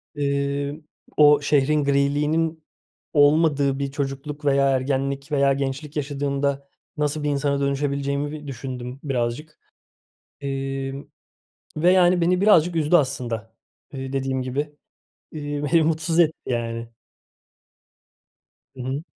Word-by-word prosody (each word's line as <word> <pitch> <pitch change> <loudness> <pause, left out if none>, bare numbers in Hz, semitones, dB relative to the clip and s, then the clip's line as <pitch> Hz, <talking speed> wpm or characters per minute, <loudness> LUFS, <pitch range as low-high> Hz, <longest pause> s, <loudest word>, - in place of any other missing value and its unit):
Eee, 140 0 -1 0.4
o 150 -1 +6
şehrin 145 +1 +2
griliğinin 150 +3 +1 0.5
olmadığı 145 -2 +3
bir 140 -1 -2
çocukluk 140 +2 -4
veya 140 -1 +3
ergenlik 135 +2 -1
veya 140 -1 +3
gençlik 140 +2 -4
yaşadığımda 140 -1 -2 0.3
nasıl 150 0 -1
bir 150 - 0
insana 140 0 0
dönüşebileceğimi 140 +1 -1
bi 150 -1 -8
düşündüm 125 -1 -6
birazcık, 135 +2 -3 0.8
emm, 135 0 -4 0.7
ve, 170 +4 +4
yani, 180 -1 +4
beni 180 +2 +2
birazcık 180 -5 +5
üzdü 160 +1 +3
aslında. 120 -7 -1 0.4
Eee, 135 0 -6
dediğim 135 -1 -1
gibi, 145 +4 -3 0.6
eee, 145 -1 -4
beni 165 -1 +6
mutsuz 160 +1 +1
etti 160 -2 +3
yani. 115 -1 -3 1.9
Hı 130 - -7
hı. 135 +4 -3
140 Hz, 115 wpm, -23 LUFS, 135-150 Hz, 1.9 s, o